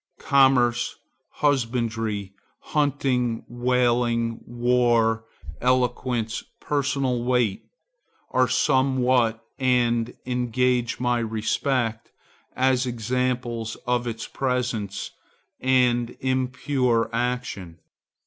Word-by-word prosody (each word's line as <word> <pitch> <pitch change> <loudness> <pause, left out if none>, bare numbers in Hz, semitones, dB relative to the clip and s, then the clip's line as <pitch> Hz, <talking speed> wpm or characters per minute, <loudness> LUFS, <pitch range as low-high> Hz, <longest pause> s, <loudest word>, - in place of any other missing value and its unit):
Commerce, 125 -3 +3 0.3
husbandry, 115 -7 -1 0.4
hunting, 130 -5 +1
whaling, 120 -1 +1
war, 120 -2 +2 0.4
eloquence, 125 -2 0 0.2
personal 135 -4 0
weight, 120 -5 0 0.6
are - - +3
somewhat, 125 -3 +2
and 120 -2 +1
engage 125 -1 0
my 125 -1 +1
respect 115 +1 -1 0.5
as 130 0 +2
examples 120 -1 -2
of 125 -1 0
its 115 -1 -4
presence 120 -7 -2 0.5
and 125 -2 +2
impure 130 -2 0
action. 120 -8 -3
125 Hz, 70 wpm, -24 LUFS, 115-130 Hz, 0.6 s, Commerce